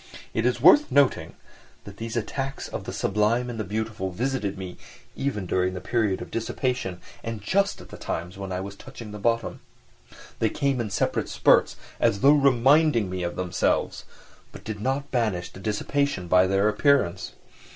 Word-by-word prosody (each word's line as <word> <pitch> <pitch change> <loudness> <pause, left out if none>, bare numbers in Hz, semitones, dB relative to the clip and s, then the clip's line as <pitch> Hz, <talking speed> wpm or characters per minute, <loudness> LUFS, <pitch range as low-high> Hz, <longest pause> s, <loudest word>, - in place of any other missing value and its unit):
It 115 +2 +1
is 125 -1 0
worth 185 - +6
noting 125 - +2 0.5
that 100 0 -11
these 115 +2 -4
attacks 135 +4 -3
of - - -6
the - - -4
"sublime 115 +5 0
and 115 - -6
the - - -1
beautiful" 105 -1 -3
visited 110 0 -2
me 95 -2 -7 0.4
even 135 -8 -2
during 90 +1 0
the - - -4
period 105 -3 0
of - - -13
dissipation 115 -4 -2 0.2
and 115 -1 -4
just 195 - 0
at - - -14
the - - -10
times 90 +2 -4
when 95 -1 -6
I 90 0 -2
was 100 +1 -7
touching 115 -1 -10
the 105 - -7
bottom. 115 +2 0 0.8
They - - +2
came 135 -3 0
in 110 - -3
separate 95 - -1
spurts, - - +3 0.2
as 100 - +2
though 140 +2 +7
reminding 135 - +4
me 95 0 -3
of 85 0 -3
themselves, 90 -1 -1 0.5
but - - -12
did 105 -2 -6
not 135 +4 -2
banish 110 -8 -1
the - - -12
dissipation 105 0 -1
by 90 +1 +5
their 95 +2 +2
appearance. 115 - +2
110 Hz, 175 wpm, -25 LUFS, 95-130 Hz, 0.8 s, though